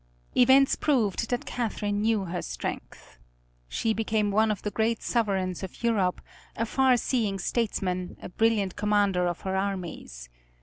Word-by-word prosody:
Events 265 +2 +6
proved 230 -6 +1
that 245 +4 -1
Catherine 205 -3 -2
knew 215 -2 +1
her 175 0 -3
strength. - - -7 0.5
She 220 - 0
became 215 -1 0
one 215 +2 +3
of 210 -3 -2
the 210 - -2
great 225 +1 0
sovereigns 190 -6 0
of 190 +4 -8
Europe, 200 -6 +1 0.3
a 230 - -1
far 260 +1 +3
seeing 220 -5 0
statesman, 185 -3 -2
a - - -8
brilliant 210 -2 +1
commander 205 -4 +2
of 175 -1 -3
her 190 0 -2
armies. 180 - -4
210 Hz, 145 wpm, -27 LUFS, 190-230 Hz, 0.5 s, Events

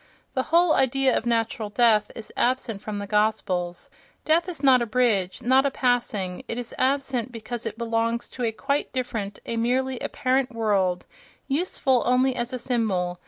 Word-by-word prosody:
The 260 - +1
whole 340 0 +5
idea 265 0 +2
of 235 - -1
natural 225 -2 0
death 215 -1 +3
is 225 - -9
absent 240 -5 0
from 210 -1 -5
the 205 - -4
Gospels: 200 -4 -1 0.3
death 330 +3 +2
is 325 -5 -7
not 260 -3 +6
a 235 - -1
bridge, 215 -4 +1
not 260 +2 +4
a 280 - +2
passing; 235 -9 -1
it 230 - -4
is 245 -1 -5
absent 260 -3 0
because 235 0 -5
it 220 0 -6
belongs 230 0 -1
to 250 - -6
a 230 - +1
quite 280 +6 -2
different, 220 -6 -3
a 230 - -3
merely 255 +2 0
apparent 255 0 0
world, 195 -5 +1 0.4
useful 275 -4 +1
only 255 +1 +3
as 240 +1 -3
a 255 - -3
symbol. 195 -8 -1
235 Hz, 170 wpm, -25 LUFS, 215-260 Hz, 0.4 s, not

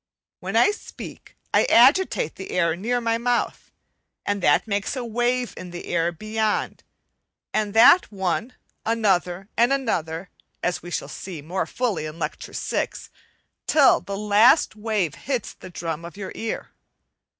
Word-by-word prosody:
When - - -5
I 415 - +5
speak 415 - -10 0.2
I - - +5
agitate 380 - +4
the 190 - -9
air 170 -2 +1
near 235 +7 -1
my 230 -1 0
mouth, 245 0 -1 0.6
and 205 -1 -1
that - - +4
makes 205 +3 -2
a 255 -2 -4
wave 240 +2 0
in 180 - -8
the 175 0 -8
air 170 0 0
beyond, 215 +4 -2 0.7
and 210 -1 -1
that 240 +9 +7
one, 200 +5 -2 0.3
another, 195 -5 0
and 240 +3 +3
another 180 - -1 0.3
(as 175 - -1
we 175 - -9
shall - - -3
see 170 -6 -8
more 180 +5 -2
fully 220 -11 -2
in 155 +1 -9
Lecture - - -5
VI) - - -1 0.8
till 290 -4 +5
the 200 0 -5
last 210 +8 +4
wave 210 -7 -1
hits 255 -3 -3
the - - -12
drum 165 -2 -5
of 170 +3 -9
your 195 -2 -6
ear. 225 - -5
205 Hz, 150 wpm, -24 LUFS, 175-235 Hz, 0.8 s, that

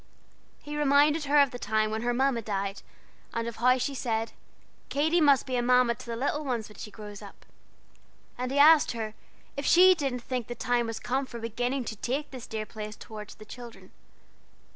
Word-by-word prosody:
He 295 0 -6
reminded 295 +1 +3
her 290 +1 +3
of 280 -3 +5
the 245 - -7
time 215 0 0
when 220 0 -2
her 240 +1 0
Mamma 255 -1 +1
died, 200 -2 -3 0.5
and 230 0 -1
of 235 - -6
how 250 +2 +4
she 260 +2 -2
said, 225 -4 -2 0.6
"Katy 315 +4 +2
must 285 -3 +5
be 260 -2 -3
a - - +1
Mamma 250 0 +4
to 235 - -12
the 230 - -3
little 285 +5 -1
ones, 240 -6 -2
when 210 - -15
she - - -7
grows 210 -1 -10
up." 200 -1 -13 0.9
And 250 0 -3
he 275 - -1
asked 300 0 +6
her 220 -2 -4 0.4
if 280 - -4
she 370 +5 +7
didn't 275 -7 -3
think 250 -3 -3
the 240 - -5
time 245 -1 0
was 225 -1 -4
come 265 +2 -1
for 235 - -8
beginning 245 +3 -2
to 225 - -5
take 265 +7 -3
this 255 -3 -8
dear 215 -1 -4
place 215 -1 -7
towards 210 -1 -10
the 215 - -13
children. 240 +1 -11
245 Hz, 205 wpm, -28 LUFS, 225-275 Hz, 0.9 s, she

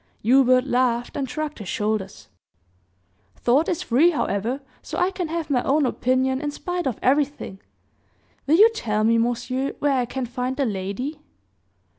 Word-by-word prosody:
Hubert 255 +2 +4
laughed 245 -2 0
and 275 -3 -2
shrugged 300 +2 -4
his 205 - -7
shoulders: 210 -2 -2 1.1
"Thought 270 +7 +2
is 345 - -1
free, 275 +9 +4
however, 240 - -1 0.2
so - - -6
I 360 +2 +2
can 365 -3 -3
have 320 -1 -3
my 250 -3 +2
own 285 +3 +2
opinion 260 +1 0
in 295 - -2
spite 355 +2 -3
of 245 - -2
everything. 275 -7 0 0.9
Will 305 - +5
you 435 +6 +7
tell 215 - -1
me, 230 +1 +3
monsieur, 245 +3 -1
where 290 -1 +1
I 245 - 0
can 255 +1 -4
find 250 +2 -3
the 280 - +1
lady?" 220 +9 -4
260 Hz, 160 wpm, -23 LUFS, 235-295 Hz, 1.1 s, you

